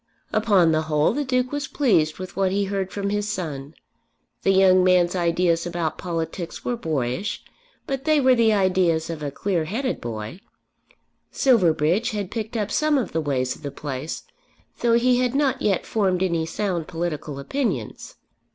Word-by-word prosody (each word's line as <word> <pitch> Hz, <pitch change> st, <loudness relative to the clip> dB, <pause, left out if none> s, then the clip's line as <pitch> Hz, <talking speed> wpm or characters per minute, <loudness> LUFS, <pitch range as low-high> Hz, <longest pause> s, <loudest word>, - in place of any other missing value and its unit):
Upon 200 Hz, -6 st, +4 dB
the 155 Hz, 0 st, +2 dB
whole 155 Hz, -1 st, +1 dB
the 290 Hz, -, -1 dB
Duke 255 Hz, -1 st, 0 dB
was 290 Hz, -1 st, -3 dB
pleased 175 Hz, -, +2 dB
with 185 Hz, -1 st, -8 dB
what 190 Hz, -1 st, +1 dB
he 200 Hz, +1 st, +1 dB
heard 195 Hz, -1 st, -3 dB
from 200 Hz, 0 st, -2 dB
his 205 Hz, 0 st, -1 dB
son. 155 Hz, -7 st, -5 dB, 0.7 s
The -, -, +1 dB
young 190 Hz, -1 st, +5 dB
man's 180 Hz, -1 st, +3 dB
ideas 170 Hz, -1 st, +1 dB
about 170 Hz, -3 st, -3 dB
politics 165 Hz, 0 st, -4 dB
were 245 Hz, -, 0 dB
boyish, 160 Hz, -, -2 dB, 0.4 s
but 270 Hz, 0 st, -4 dB
they 310 Hz, -1 st, +4 dB
were 260 Hz, -2 st, +5 dB
the 230 Hz, -2 st, +4 dB
ideas 185 Hz, -5 st, +2 dB
of 160 Hz, -2 st, -6 dB
a 145 Hz, -, -2 dB
clear 170 Hz, +2 st, -1 dB
headed 250 Hz, -, -2 dB
boy. 110 Hz, -, -6 dB, 0.9 s
Silverbridge 185 Hz, -, +2 dB
had 200 Hz, -3 st, -4 dB
picked 225 Hz, 0 st, -4 dB
up 210 Hz, -1 st, -2 dB
some 305 Hz, +3 st, +2 dB
of 245 Hz, -8 st, -2 dB
the 160 Hz, -, -1 dB
ways 130 Hz, -4 st, -1 dB
of -, -, -17 dB
the 145 Hz, -, -4 dB
place, 140 Hz, +1 st, -5 dB, 0.6 s
though 235 Hz, -1 st, +2 dB
he 245 Hz, +1 st, +3 dB
had 250 Hz, 0 st, 0 dB
not 270 Hz, -2 st, +1 dB
yet 200 Hz, -3 st, +1 dB
formed 190 Hz, -4 st, +1 dB
any 170 Hz, -3 st, 0 dB
sound 175 Hz, -3 st, -2 dB
political 165 Hz, -4 st, -4 dB
opinions. 240 Hz, -, -3 dB
185 Hz, 170 wpm, -23 LUFS, 160-225 Hz, 0.9 s, young